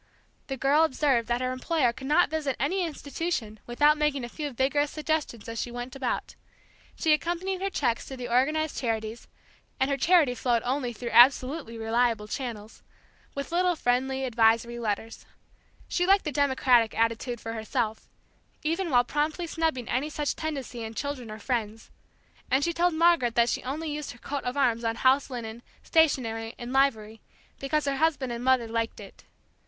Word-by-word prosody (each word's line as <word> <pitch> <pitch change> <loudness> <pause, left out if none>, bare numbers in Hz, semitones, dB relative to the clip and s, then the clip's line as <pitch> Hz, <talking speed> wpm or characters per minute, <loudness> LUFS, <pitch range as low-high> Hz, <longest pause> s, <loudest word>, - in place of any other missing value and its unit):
The 270 - -4
girl 280 +4 +4
observed 265 -6 +1
that 240 +1 0
her 255 0 -1
employer 255 -1 +1
could 265 +2 -8
not 305 +1 +3
visit 295 -4 -1
any 360 +9 0
institution 290 -8 -4
without 295 +5 +3
making 295 -3 0
a 240 - -5
few 295 +3 -4
vigorous 280 +3 +1
suggestions 305 -7 -3
as 230 0 -3
she - - -4
went 245 +1 -6
about, 265 -3 -3 0.6
she 315 - +3
accompanied 350 +4 -1
her 390 - 0
cheques 245 -10 -1
to 265 - -7
the 245 -1 -5
organized 300 +6 +1
charities 225 -1 -3 0.5
and 265 +1 +1
her 275 - +1
charity 320 -5 +4
flowed 240 -2 0
only 255 -1 -1
through 235 +1 -6
absolutely 255 +1 +4
reliable 225 -1 0
channels 225 -4 -6 0.5
with 280 +2 -5
little 355 +1 +2
friendly, 265 0 0
advisory 235 0 +2
letters. 225 0 -4 0.6
She 355 0 0
liked 390 +1 +4
the 300 - -1
democratic 260 -5 +3
attitude 230 +1 0
for 225 0 -6
herself, 220 0 -3 0.5
even 335 +4 -1
while 245 -4 +4
promptly 300 +6 -1
snubbing 320 -7 -1
any 275 +4 -1
such 295 -1 -2
tendency 270 -7 -5
in 225 0 -7
children 280 -4 -4
or 215 - -7
friends; 225 -1 -3 0.6
and 265 +2 +2
told 350 -1 +2
Margaret 325 -8 +3
that 235 0 +4
she - - -1
only 300 +5 -4
used 295 -2 -5
her - - -16
coat 280 +3 -5
of 250 +3 -3
arms 240 -4 +2
on 225 0 0
house 265 +3 +3
linen, 235 -2 -6 0.2
stationery, 230 -8 +1
and 240 +1 -6
livery, 225 -6 +1 0.4
because 295 +2 0
her 275 -1 0
husband 295 -5 +1
and 235 0 -5
mother 255 -2 +3
liked 230 0 -2
it. 200 -2 -13
260 Hz, 170 wpm, -27 LUFS, 235-300 Hz, 0.6 s, girl